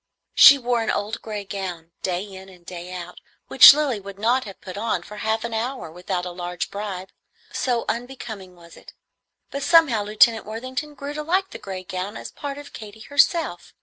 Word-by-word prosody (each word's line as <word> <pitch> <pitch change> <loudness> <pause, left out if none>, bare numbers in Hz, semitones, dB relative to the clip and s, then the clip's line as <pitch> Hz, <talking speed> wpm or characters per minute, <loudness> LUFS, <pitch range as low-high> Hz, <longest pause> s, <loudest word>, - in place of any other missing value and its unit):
She 280 - +9
wore 245 -2 0
an 225 - -2
old 210 +2 -2
gray 210 -2 -5
gown, 180 -4 -6
day 180 0 -2
in 190 -1 -11
and 180 -2 -18
day 180 0 -8
out, 180 -1 -8 0.3
which - - +11
Lilly 285 -6 0
would 200 0 -10
not 245 +5 +1
have 195 - -10
put 185 - -9
on 205 -4 -2
for 210 +3 -11
half 220 +1 -1
an 235 -1 -4
hour 235 -5 -3
without 180 +1 -4
a 180 - -5
large 175 -1 -5
bribe, 200 -2 -6 0.4
so 245 -3 -1
unbecoming 230 -6 -6
was 170 -1 -16
it; - - -15 0.6
but 280 - -4
somehow 285 -7 +4
Lieutenant 215 +1 +3
Worthington 255 +7 -5
grew 280 +1 -6
to 300 - -4
like 375 +5 0
the - - -8
gray 190 -1 -7
gown 185 +2 -5
as - - -8
a - - -35
part 285 -1 -6
of 290 0 -11
Katy 215 0 -10
herself. 285 - +1
210 Hz, 200 wpm, -23 LUFS, 185-255 Hz, 0.6 s, which